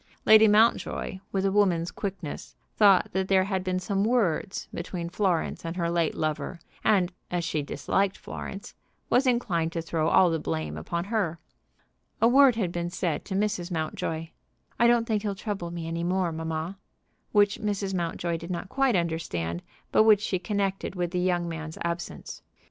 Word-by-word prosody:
Lady 220 Hz, 0 st, +8 dB
Mountjoy, 210 Hz, -2 st, +2 dB
with 195 Hz, 0 st, 0 dB
a 195 Hz, -, +2 dB
woman's 180 Hz, -4 st, +2 dB
quickness, 190 Hz, -7 st, -6 dB, 0.2 s
thought 200 Hz, -4 st, +5 dB
that 190 Hz, 0 st, 0 dB
there 190 Hz, -1 st, +4 dB
had 190 Hz, -1 st, -2 dB
been 185 Hz, -1 st, -1 dB
some 195 Hz, +2 st, -1 dB
words 210 Hz, -5 st, 0 dB
between 170 Hz, 0 st, -4 dB
Florence 180 Hz, -3 st, 0 dB
and 165 Hz, +1 st, -4 dB
her 170 Hz, -2 st, -1 dB
late 170 Hz, -2 st, +1 dB
lover, 155 Hz, +3 st, -2 dB, 0.2 s
and, 190 Hz, -4 st, +3 dB, 0.2 s
as 175 Hz, -1 st, -1 dB
she 160 Hz, -3 st, -1 dB
disliked 195 Hz, +6 st, -1 dB
Florence, 195 Hz, +1 st, -7 dB, 0.4 s
was 260 Hz, +2 st, +4 dB
inclined 185 Hz, -10 st, +1 dB
to 165 Hz, -, -3 dB
throw 160 Hz, -1 st, -1 dB
all 180 Hz, +1 st, +5 dB
the 165 Hz, -, 0 dB
blame 80 Hz, -, -3 dB
upon 170 Hz, -, -3 dB
her. 195 Hz, -5 st, -1 dB, 0.8 s
A 230 Hz, -, +5 dB
word 265 Hz, 0 st, +6 dB
had 195 Hz, -7 st, -1 dB
been 175 Hz, 0 st, -3 dB
said 175 Hz, -4 st, -2 dB
to 190 Hz, -, -4 dB
Mrs. 200 Hz, -3 st, -1 dB
Mountjoy, 160 Hz, -1 st, -3 dB, 0.5 s
"I 235 Hz, -, +6 dB
don't 235 Hz, -1 st, +4 dB
think 215 Hz, -2 st, 0 dB
he'll 205 Hz, -2 st, -2 dB
trouble 195 Hz, -4 st, -4 dB
me 170 Hz, -1 st, -5 dB
any 165 Hz, +1 st, -3 dB
more, 180 Hz, 0 st, 0 dB
mamma," 160 Hz, +3 st, -4 dB, 0.5 s
which 205 Hz, -1 st, +3 dB
Mrs. 200 Hz, -2 st, -2 dB
Mountjoy 170 Hz, -1 st, -2 dB
did 170 Hz, +2 st, -9 dB
not 180 Hz, +1 st, -4 dB
quite 270 Hz, -2 st, +2 dB
understand, 125 Hz, -, -2 dB, 0.3 s
but -, -, +5 dB
which 215 Hz, -2 st, +6 dB
she 190 Hz, -3 st, -1 dB
connected 195 Hz, -1 st, -2 dB
with 175 Hz, -1 st, -2 dB
the 180 Hz, -, -1 dB
young 175 Hz, -1 st, +1 dB
man's 160 Hz, -1 st, -6 dB
absence. 170 Hz, 0 st, -5 dB
180 Hz, 175 wpm, -27 LUFS, 170-205 Hz, 0.8 s, Lady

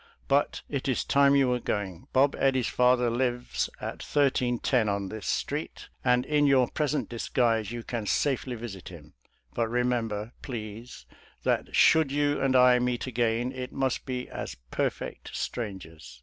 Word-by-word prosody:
But 140 Hz, +1 st, +1 dB
it 140 Hz, -2 st, -3 dB
is 130 Hz, -, +1 dB
time 140 Hz, 0 st, +4 dB
you 135 Hz, -2 st, +4 dB
were 125 Hz, 0 st, +1 dB
going. 95 Hz, -6 st, -4 dB
Bob 135 Hz, +1 st, +3 dB
Eddy's 130 Hz, -3 st, +2 dB
father 125 Hz, 0 st, +3 dB
lives 120 Hz, 0 st, -1 dB
at -, -, -6 dB
1310 125 Hz, -4 st, +1 dB
on 100 Hz, -1 st, -2 dB
this 110 Hz, -2 st, -7 dB
street, -, -, -3 dB
and 125 Hz, +1 st, +3 dB
in 145 Hz, 0 st, +2 dB
your 130 Hz, -3 st, +4 dB
present 150 Hz, -1 st, -1 dB
disguise 115 Hz, -2 st, 0 dB
you 120 Hz, -1 st, -5 dB
can 115 Hz, -4 st, -4 dB
safely 130 Hz, -1 st, 0 dB
visit 110 Hz, -6 st, -8 dB
him. 75 Hz, -4 st, -13 dB, 0.4 s
But 115 Hz, -, 0 dB
remember, 115 Hz, -2 st, -1 dB
please, 115 Hz, -2 st, -7 dB, 0.4 s
that -, -, 0 dB
should 160 Hz, -3 st, +5 dB
you 145 Hz, 0 st, +1 dB
and 135 Hz, -1 st, +2 dB
I 125 Hz, -1 st, +6 dB
meet 125 Hz, 0 st, -1 dB
again 120 Hz, 0 st, 0 dB
it 130 Hz, -1 st, -6 dB
must 135 Hz, 0 st, -1 dB
be 125 Hz, -1 st, -3 dB
as -, -, -6 dB, 0.2 s
perfect -, -, -3 dB
strangers. 80 Hz, -, -6 dB
125 Hz, 155 wpm, -28 LUFS, 110-130 Hz, 0.4 s, I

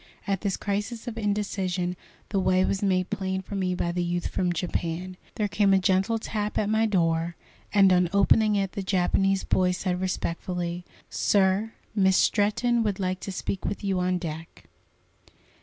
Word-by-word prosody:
At 195 Hz, -2 st, -1 dB
this 200 Hz, -3 st, -1 dB
crisis 210 Hz, +4 st, -3 dB
of 235 Hz, -, -4 dB
indecision 195 Hz, -4 st, -1 dB, 0.3 s
the 200 Hz, -, 0 dB
way 185 Hz, 0 st, +3 dB
was 195 Hz, -, -1 dB
made 185 Hz, -2 st, +1 dB
plain 190 Hz, 0 st, -2 dB
for 205 Hz, -, -9 dB
me 185 Hz, -2 st, 0 dB
by 170 Hz, -1 st, -1 dB
the 175 Hz, +1 st, -1 dB
youth 175 Hz, 0 st, -2 dB
from 180 Hz, -1 st, 0 dB
Japan. 175 Hz, +1 st, -3 dB, 0.2 s
There 210 Hz, -3 st, 0 dB
came 200 Hz, -1 st, +3 dB
a -, -, +5 dB
gentle 190 Hz, +4 st, +2 dB
tap 210 Hz, -1 st, -3 dB
at 205 Hz, -, +1 dB
my 220 Hz, +1 st, +3 dB
door, 170 Hz, -3 st, +1 dB, 0.4 s
and 195 Hz, -2 st, +5 dB
on 180 Hz, -1 st, +3 dB
opening 210 Hz, +2 st, +4 dB
it 195 Hz, -2 st, 0 dB
the 200 Hz, -, -4 dB
Japanese 195 Hz, +1 st, +1 dB
boy 185 Hz, -1 st, +2 dB
said 180 Hz, 0 st, -2 dB
respectfully: 175 Hz, -1 st, -3 dB, 0.3 s
"Sir, 200 Hz, +2 st, +2 dB, 0.2 s
Miss 190 Hz, -3 st, +3 dB
Stretton 230 Hz, +3 st, +2 dB
would 205 Hz, -3 st, -1 dB
like 185 Hz, -1 st, -1 dB
to 195 Hz, -, -6 dB
speak 190 Hz, +1 st, -4 dB
with 205 Hz, -, -3 dB
you 195 Hz, -2 st, 0 dB
on 180 Hz, 0 st, +1 dB
deck." 165 Hz, -2 st, -7 dB
190 Hz, 175 wpm, -26 LUFS, 180-205 Hz, 0.4 s, a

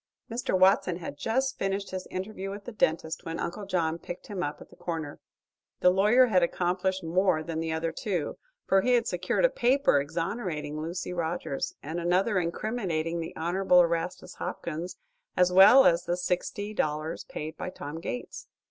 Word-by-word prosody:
Mr. 235 Hz, -4 st, 0 dB
Watson 185 Hz, -1 st, +4 dB
had 170 Hz, -4 st, -6 dB
just 255 Hz, -, -1 dB
finished 195 Hz, +1 st, -2 dB
his 185 Hz, 0 st, -5 dB
interview 195 Hz, +1 st, -5 dB
with 200 Hz, +1 st, -7 dB
the 245 Hz, -, -6 dB
dentist 160 Hz, -6 st, 0 dB
when 165 Hz, 0 st, -5 dB
Uncle 195 Hz, +3 st, -4 dB
John 170 Hz, -3 st, 0 dB
picked 175 Hz, +2 st, -8 dB
him 195 Hz, -3 st, -3 dB
up 145 Hz, -3 st, -3 dB
at -, -, -14 dB
the -, -, -15 dB
corner. 160 Hz, -4 st, -5 dB, 0.6 s
The 180 Hz, -, +6 dB
lawyer 210 Hz, +7 st, +5 dB
had 190 Hz, -7 st, +3 dB
accomplished 180 Hz, +2 st, 0 dB
more 165 Hz, -1 st, +2 dB
than 160 Hz, 0 st, -4 dB
the 165 Hz, 0 st, -2 dB
other 160 Hz, +1 st, -1 dB
two, 175 Hz, -4 st, -3 dB, 0.3 s
for 195 Hz, 0 st, +4 dB
he 250 Hz, +5 st, +2 dB
had 235 Hz, -2 st, +3 dB
secured 185 Hz, -, +1 dB
a -, -, +5 dB
paper 265 Hz, -, +3 dB
exonerating 160 Hz, -1 st, -3 dB
Lucy 175 Hz, +3 st, -4 dB
Rogers 170 Hz, -4 st, -3 dB
and 160 Hz, +4 st, -4 dB
another 185 Hz, +4 st, +2 dB
incriminating 170 Hz, -3 st, -2 dB
the 165 Hz, -, -6 dB
Honorable 180 Hz, +2 st, +3 dB
Erastus 170 Hz, +1 st, -1 dB
Hopkins, 170 Hz, +2 st, -5 dB, 0.4 s
as 180 Hz, 0 st, +4 dB
well 205 Hz, +9 st, +9 dB
as 170 Hz, +1 st, +4 dB
the 175 Hz, -, 0 dB
sixty 185 Hz, +4 st, -2 dB
dollars 155 Hz, -3 st, -2 dB
paid 155 Hz, +1 st, -6 dB
by -, -, -5 dB
Tom 155 Hz, -3 st, -7 dB
Gates. 125 Hz, -7 st, -6 dB
180 Hz, 175 wpm, -28 LUFS, 165-195 Hz, 0.6 s, well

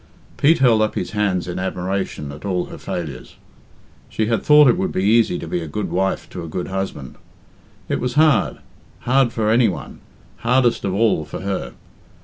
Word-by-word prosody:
Pete 160 Hz, +4 st, +4 dB
held 120 Hz, -5 st, +4 dB
up 110 Hz, -, 0 dB
his -, -, -3 dB
hands 100 Hz, -4 st, 0 dB
in 90 Hz, +1 st, -4 dB
admiration 95 Hz, -5 st, -3 dB
at 75 Hz, +2 st, -11 dB
all 90 Hz, -3 st, -1 dB
her -, -, -10 dB
failures. 75 Hz, -7 st, -6 dB, 0.7 s
She 110 Hz, -, -1 dB
had 115 Hz, -1 st, 0 dB
thought 150 Hz, -1 st, +6 dB
it 125 Hz, -, +5 dB
would 190 Hz, +1 st, -2 dB
be 95 Hz, -, -1 dB
easy 110 Hz, -3 st, +3 dB
to -, -, -7 dB
be 85 Hz, +1 st, -2 dB
a 80 Hz, -, -6 dB
good 100 Hz, +8 st, -4 dB
wife 95 Hz, +1 st, -1 dB
to 90 Hz, -, -6 dB
a -, -, -6 dB
good 90 Hz, +3 st, -4 dB
husband. 95 Hz, -9 st, -5 dB, 0.7 s
It -, -, -1 dB
was 125 Hz, +1 st, -3 dB
hard 150 Hz, -5 st, +3 dB, 0.4 s
hard 130 Hz, -1 st, +2 dB
for 110 Hz, -2 st, 0 dB
any 120 Hz, +1 st, +4 dB
one, 95 Hz, -, -6 dB, 0.4 s
hardest 125 Hz, -1 st, +1 dB
of 95 Hz, -1 st, -1 dB
all 105 Hz, -7 st, +2 dB
for 75 Hz, -, -7 dB
her. 95 Hz, -11 st, -3 dB
100 Hz, 190 wpm, -20 LUFS, 90-120 Hz, 0.7 s, thought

